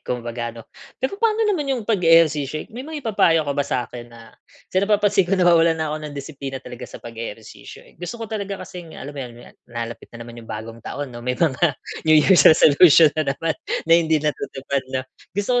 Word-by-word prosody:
kumbaga, 120 -1 -3
no? 115 - -10 0.3
Pero 395 - -3
paano 450 -1 +2
naman 340 -10 0
yung 250 -5 -1
pag-eehersisyo, 165 - +3
eh, - - -20
may 240 - -7
maipapayo 225 - +1
ka 140 - -1
ba 140 - -1
sa'kin 120 -3 -4
na 115 -1 -15 0.4
kasi 185 - +3
napapansin 205 -1 +2
ko 195 - +2
nawawalan 170 -2 +4
na 155 -1 -2
ko 155 - -4
ng 150 -2 -8
disiplina 140 -1 -6
talaga 125 -2 -9
sa - - -10
pag-eehersisyo, 115 -1 -9
eh. - - -20
Gusto 175 +6 -5
ko 230 - -6
talaga 200 -2 -4
kasing 175 -3 -10
alam 145 +2 -8
mo 145 - -7
yun 120 -2 -9
nat - - -18
nalalapit 115 -1 -6
na 115 - -9
naman 120 0 -10
yung 115 - -15
bagong 115 +2 -7
taon, 140 +3 -6
'no, 120 - -8
may 125 +1 -2
mga 160 -1 +1 0.3
New 155 - +7
Year's 155 0 +6
resolution 155 0 +6
na 155 -3 -2
naman 165 0 -1 0.3
na 165 - +2
hindi 165 -1 +4
natutupad, 140 -2 -2
'no? 130 0 -3 0.3
Gusto 245 +5 +1
155 Hz, 205 wpm, -21 LUFS, 125-190 Hz, 0.4 s, New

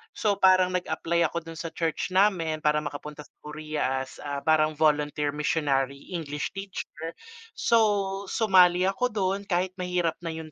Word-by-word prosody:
so 210 -2 +1
parang 185 -2 +4
nag-apply 170 -1 0
ako 170 -1 -5
dun 165 - -8
sa 165 -1 -5
church 165 +1 -2
namin 185 -5 +2
para 150 0 +3
maka-punta 150 +1 -7
sa - - -23
Korea 150 -3 -2
as 130 - -13
a 145 -1 -3
parang 155 0 +3
volunteer 150 -1 +1
missionary 140 -2 -1
English 150 -5 -4
teacher. 185 -4 -7 0.4
So, 205 -4 +2
sumali 185 -4 +4
ako 195 +7 0
dun 195 0 0
kahit 180 0 0
mahirap 180 -3 0
na 165 -1 -5
yung 160 -1 -8
165 Hz, 155 wpm, -26 LUFS, 150-185 Hz, 0.4 s, parang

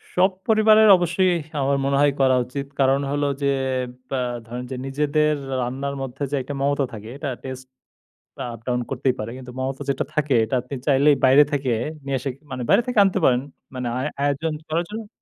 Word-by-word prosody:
সব 185 +2 +4 0.2
পরিবারের 215 -1 +6
অবশ্যই 180 +1 +2 0.3
আমার 140 +1 +2
মনে 140 0 +1
হয়, 145 - +5
করা 130 -1 +4
উচিত। 140 +3 -5
কারণ 135 +1 +4
হলো 145 0 0 0.2
যে 140 - +1 0.6
ব্যা 135 - -1 0.3
ধরেন 120 +2 -6
যে, - - -3
নিজেদের 150 +2 +1 0.3
রান্নার 135 +3 -3
মধ্যে 135 +2 -5
যে - - +1
একটা 135 +3 -6
মমতা 140 0 +1
থাকে, 110 +1 -8
এটা 145 -2 -4
টেস্ট 130 0 -7 0.9
আপ-ডাউন 125 +2 -2
করতেই 135 -1 0
পারে। 110 +1 -4
কিন্তু 125 -1 -9
মমতা 135 +1 -3
যেটা 140 0 0
থাকে, 150 -2 +1
এটা 130 - -1
আপনি 125 +3 -7
চাইলেই 140 +1 +5
বাইরে 135 +3 +7
থেকে 135 -3 0 0.3
নিয়ে 135 -1 0
এসে 135 +3 -3 0.2
মানে, 130 - -4
বাইরে - - +6
থেকে 250 - -3
আনতে 195 0 +1
পারেন, 125 -1 +4 0.3
মানে 125 -1 -3
আ - - -1 0.2
আয়োজন 145 +3 0 0.2
করো 165 +2 +1
জোন্য 215 0 -6
140 Hz, 185 wpm, -23 LUFS, 130-150 Hz, 0.9 s, বাইরে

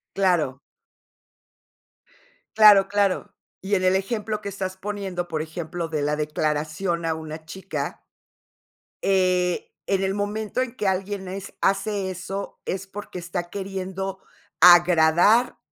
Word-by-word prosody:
Claro. 170 -9 +1 2.0
Claro, 205 -3 +8
claro. 200 -2 0 0.3
Y 195 +2 -4
en 185 - 0
el 185 +1 +4
ejemplo 215 +1 -2
que 200 - -4
estás 190 -1 -5
poniendo, 190 -3 -4
por 160 -2 -2
ejemplo, 165 +1 -5
de 155 -2 -2
la 150 +1 +1
declaración 155 +3 -1
a 160 - 0
una 155 0 -8
chica. 190 +3 -5 1.0
Eh, 185 -2 +2 0.2
en 195 -1 +1
el 190 0 0
momento 210 +4 -2
en 255 -1 -4
que 205 - -1
alguien 190 +1 -2
es 190 +1 -7
hace 195 0 0
eso, 190 +2 -6
es 190 0 -4
porque 195 -2 -8
está 175 0 -4
queriendo 190 0 -5 0.4
agradar 175 +5 +6
190 Hz, 125 wpm, -24 LUFS, 175-200 Hz, 2.0 s, Claro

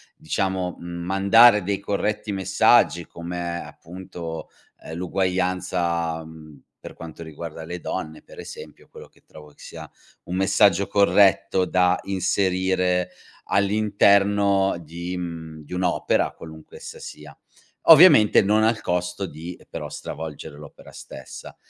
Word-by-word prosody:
diciamo, 95 +1 -3
mhmm, 85 - -11 0.2
mandare 100 +4 +5
dei 100 +1 -2
corretti 105 +1 -3
messaggi 95 -2 +2
come 85 0 -5
appunto, 85 -2 -9 0.4
uhm, 80 - -8
l'uguaglianza, 90 -2 -2
mhmm, 80 -2 -14 0.2
per - - -11
quanto 85 0 -11
riguarda 80 0 -9
le 90 +2 -6
donne, 80 0 -5
per - - -16
esempio, - - -11
quello - - -13
che - - -29
trovo 75 -1 -15
che 75 - -24
sia - - -10 0.3
un 90 - -6
messaggio 95 0 +3
corretto 100 -2 +3
da 90 -1 +2
inserire 95 -1 0 0.4
all'interno 100 -1 +2
di 85 +3 -7
mhmm, 80 -3 -7
di 90 - -10
un'opera, 90 -1 0
qualunque 80 -1 -13
essa - - -10
sia, 75 -2 -11 0.5
ovviamente 160 - +8
non 105 +2 +2
al 110 -1 +1
costo 90 +1 -2
di, 85 +1 -9
ehm, - - -21
però, - - -6
stravolgere 80 -1 -8
l'opera 75 - -14
stessa. 65 - -11
90 Hz, 125 wpm, -23 LUFS, 85-100 Hz, 0.5 s, ovviamente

